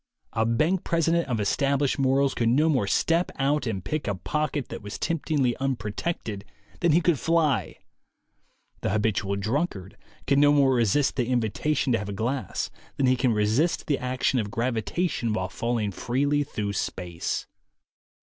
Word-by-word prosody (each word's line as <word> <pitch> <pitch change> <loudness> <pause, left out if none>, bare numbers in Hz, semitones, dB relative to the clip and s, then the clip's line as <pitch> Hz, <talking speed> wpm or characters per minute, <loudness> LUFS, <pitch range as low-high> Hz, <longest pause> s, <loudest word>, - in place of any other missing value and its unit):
A 110 0 +1
bank 155 +11 +1
president 170 0 +1
of 120 -4 -1
established 140 +7 +1
morals 135 +1 +2
could 115 -1 +1
no 150 +7 +3
more 130 -10 +1
step 165 - +1
out 140 0 0
and 95 -5 -3
pick 155 -4 -2
a 100 - 0
pocket 150 - -2
that - - -6
was 105 0 -6
temptingly 145 -7 0
unprotected 115 - -3 0.4
than 170 -2 +3
he 170 +4 +4
could 170 -6 +2
fly. 150 - +1 1.0
The - - -2
habitual 100 -1 0
drunkard 105 - -2 0.3
can 140 0 +3
no 145 0 +6
more 140 -2 +4
resist 125 +4 +2
the 120 -3 +1
invitation 125 +3 0
to 115 - +2
have 105 0 -5
a - - -3
glass 115 +1 -2 0.3
than 135 - +2
he 130 0 +4
can 125 -1 +1
resist 110 +11 +1
the 145 - 0
action 130 0 0
of 105 -2 -2
gravi 115 +1 -1
tation 120 -9 -1
while 95 -3 -2
falling 115 -1 -1
freely 140 +8 0
through 105 -7 -4
space. 90 -3 -3
130 Hz, 165 wpm, -26 LUFS, 105-145 Hz, 1.0 s, no